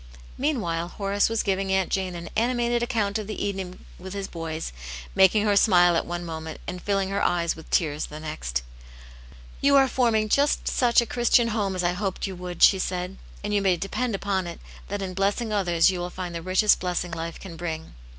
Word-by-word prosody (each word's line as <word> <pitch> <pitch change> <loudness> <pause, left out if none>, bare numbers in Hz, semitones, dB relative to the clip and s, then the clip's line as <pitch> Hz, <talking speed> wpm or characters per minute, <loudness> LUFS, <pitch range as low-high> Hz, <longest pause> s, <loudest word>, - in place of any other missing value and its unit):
Meanwhile, 185 - -1
Horace 200 +1 +1
was 225 -1 0
giving 195 -1 0
Aunt 190 -1 +1
Jane 185 -2 -1
an 170 0 -7
animated 240 +1 +1
account 220 -4 0
of 210 - -6
the 215 - -5
evening 190 -2 -4
with 190 +1 -8
his 195 -1 -3
boys, 165 - -5 0.4
making 190 +2 +5
her 205 -1 +3
smile 175 -4 +5
at 165 - 0
one 175 0 -4
moment 160 -1 -6
and 180 0 -5
filling 195 -1 0
her 200 +1 -1
eyes 170 -1 +1
with 160 - -13
tears 155 -3 +1
the 150 - -8
next. 150 - -3 0.5
" - - -19
You 280 0 +5
are 270 -1 +6
forming 230 -4 +2
just 285 +7 +2
such 240 -2 +4
a - - -2
Christian 240 0 +3
home 205 -4 -1
as 180 - -1
I 175 0 +2
hoped 195 0 -2
you 195 -2 -5
would," 180 -1 -3
she 190 - +7
said. 180 +1 -3
" - - -19
And 205 0 -2
you 205 - +3
may 190 -2 +3
depend 215 +5 -2
upon 195 -2 -1
it, 170 - -7 0.3
that 200 0 -3
in 185 -1 -4
blessing 200 +4 0
others 175 -3 +3
you 180 - -4
will 175 0 -3
find 180 -1 -6
the 170 - -4
richest 185 +4 +3
blessing 180 -1 -2
life 165 0 -5
can 185 -4 -9
bring." 160 -1 -5
190 Hz, 215 wpm, -25 LUFS, 175-210 Hz, 0.5 s, she